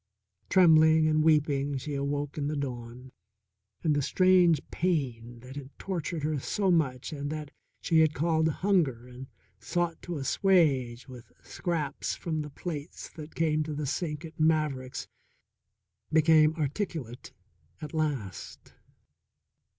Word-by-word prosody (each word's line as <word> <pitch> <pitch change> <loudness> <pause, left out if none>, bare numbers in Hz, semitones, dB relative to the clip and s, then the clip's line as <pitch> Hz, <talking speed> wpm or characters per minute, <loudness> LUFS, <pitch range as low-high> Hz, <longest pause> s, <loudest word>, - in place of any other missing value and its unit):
Trembling 160 -3 +6
and 155 0 +2
weeping 145 -3 +2
she 145 +3 -5
awoke 140 +1 -2
in 145 -2 -2
the 150 - -2
dawn, 125 -2 -6 0.7
and 155 -3 +3
the 145 - +1
strange 180 0 +4
pain 120 -9 -2
that 130 +2 -11
had 140 -2 -7
tortured 170 -4 -4
her 150 -1 0
so 195 +7 0
much 145 -3 0
and 145 -1 -4
that 150 -2 -5 0.3
she 165 -2 +3
had 155 -1 +3
called 160 +1 +2
hunger 160 - +1
and 125 +1 -10 0.3
sought 175 -1 -2
to 175 -2 -5
assuage 135 -6 +2
with 125 -3 -12
scraps 160 -6 -3
from 160 -2 -3
the 150 - -6
plates 150 +1 -7
that 155 -1 -11
came 155 -2 +1
to 155 -1 -3
the 150 0 -3
sink 150 +2 -3
at 160 0 -12
Maverick's 155 -5 0 1.0
became 155 0 +5
articulate 150 - -4 0.5
at 150 - -8
last. 145 - -4
150 Hz, 135 wpm, -28 LUFS, 135-160 Hz, 1.0 s, Trembling